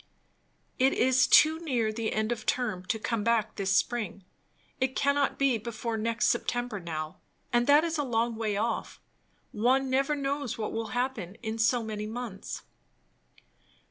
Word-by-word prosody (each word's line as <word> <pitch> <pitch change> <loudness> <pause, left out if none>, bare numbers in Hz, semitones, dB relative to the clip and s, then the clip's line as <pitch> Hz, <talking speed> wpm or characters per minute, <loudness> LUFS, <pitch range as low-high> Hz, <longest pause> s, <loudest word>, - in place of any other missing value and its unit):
"It 265 +1 +4
is 255 0 +4
too 315 +1 +6
near 245 -9 0
the 225 0 -2
end 220 +1 0
of 235 -2 -4
term, 215 -8 0
to 220 - 0
come 225 -1 -2
back 230 -1 +1
this 195 -1 +1
spring. 225 -5 -1 0.6
It 260 0 0
cannot 280 0 +1
be 270 -4 +2
before 230 +1 -4
next 225 0 0
September 245 -3 -1
now; 155 -3 -5 0.3
and 240 0 +3
that 290 +2 +6
is 330 -2 -1
a - - +1
long 235 -2 0
way 215 -2 -1
off. 230 +3 -2 0.5
One 260 +5 +2
never 275 +3 +2
knows 280 -2 -2
what 215 -2 -3
will 225 0 -2
happen 245 -7 -2
in 220 0 -3
so 230 +2 +3
many 215 -1 -4
months!" 225 -3 -6
235 Hz, 160 wpm, -29 LUFS, 215-260 Hz, 0.6 s, too